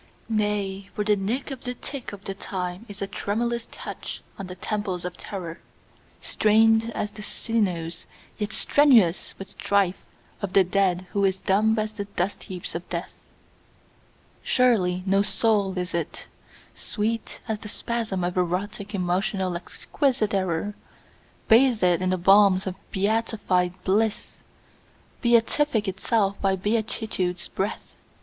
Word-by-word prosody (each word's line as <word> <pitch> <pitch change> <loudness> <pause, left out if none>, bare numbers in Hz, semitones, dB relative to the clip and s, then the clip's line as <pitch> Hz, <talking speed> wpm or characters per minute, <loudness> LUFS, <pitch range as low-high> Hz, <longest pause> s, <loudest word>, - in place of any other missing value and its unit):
Nay, 205 -2 -1
for 210 - 0
the 210 0 +3
nick 225 +9 -2
of 265 -2 -7
the 250 0 -4
tick 275 0 -6
of 200 -1 -10
the 195 - -4
time 185 +1 -5
is 200 0 -5
a - - -2
tremulous 235 +4 -2
touch - - -7 0.2
on 195 - -5
the 180 - -7
temples 190 -2 -3
of 180 0 -4
terror, 175 -5 -6 0.6
Strained 225 +1 +4
as 210 - -2
the 210 - -10
sinews 185 -7 -2 0.3
yet 210 0 -2
strenuous 230 - +4
with 195 0 -9
strife 195 -2 +1 0.4
of 195 -3 -3
the 195 - +7
dead 185 -1 +1
who 200 - +1
is 190 -1 +2
dumb 215 +4 +2
as 215 0 -1
the 205 -2 -4
dust 200 -1 -3
heaps 180 -2 -6
of 170 +1 -6
death; 170 0 -4 1.3
Surely 185 -8 +2
no 195 +1 +3
soul 205 -2 +1
is 180 -1 -2
it, 170 -2 -3 0.5
sweet 225 +1 -3
as 220 -2 -2
the 210 - -8
spasm 225 -5 -2
of 175 0 -1
erotic 200 +4 -1
emotional 185 0 0
exquisite 225 - -1
error, 185 +1 0 0.7
Bathed 235 -2 +5 0.2
in 185 - +1
the 185 - +1
balms 195 +1 +5
of 190 - -2 0.2
beatified 200 -3 +1
bliss, 215 +3 0 0.8
beatific 235 -1 +3
itself 200 +1 0
by 195 -1 +3
beatitude's 205 -3 -1
breath. 195 +2 -4
200 Hz, 140 wpm, -25 LUFS, 185-220 Hz, 1.3 s, the